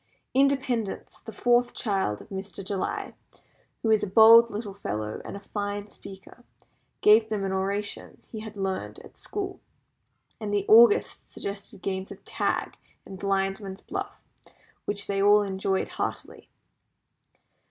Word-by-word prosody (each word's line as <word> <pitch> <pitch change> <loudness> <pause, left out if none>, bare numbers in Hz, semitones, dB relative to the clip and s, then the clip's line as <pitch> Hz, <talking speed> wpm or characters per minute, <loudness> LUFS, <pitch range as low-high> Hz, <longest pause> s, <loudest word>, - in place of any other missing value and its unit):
Independence, 260 -5 0
the 225 - -9
fourth 240 +3 +2
child 195 - -1
of - - -15
Mr. 195 0 -6
July, 195 -1 -3 0.7
who 225 - +2
is 215 - +4
a - - -2
bold 225 +4 +8
little 210 -2 -5
fellow, 105 - -4
and - - -7
a - - -11
fine 205 0 -4
speaker, 195 +6 -13 0.6
gave 220 +1 +6
them 210 -2 -2
an 190 - -2
oration 200 +2 -3
he 220 - -6
had 215 -1 -9
learned 190 -1 -3
at - - -15
school; 385 -2 -5 0.8
and 210 -2 -4
the 205 -1 0
Augusts 225 0 +5
suggested 200 -1 -6
games 190 0 -3
of - - -12
tag - - -2 0.3
and 190 -1 -10
blindman's 195 0 -2
buff, 400 +1 -6 0.7
which 205 0 -1
they 195 -1 -1
all 205 +1 +6
enjoyed 190 -1 -1
heartily. - - -5
205 Hz, 140 wpm, -26 LUFS, 195-225 Hz, 0.8 s, bold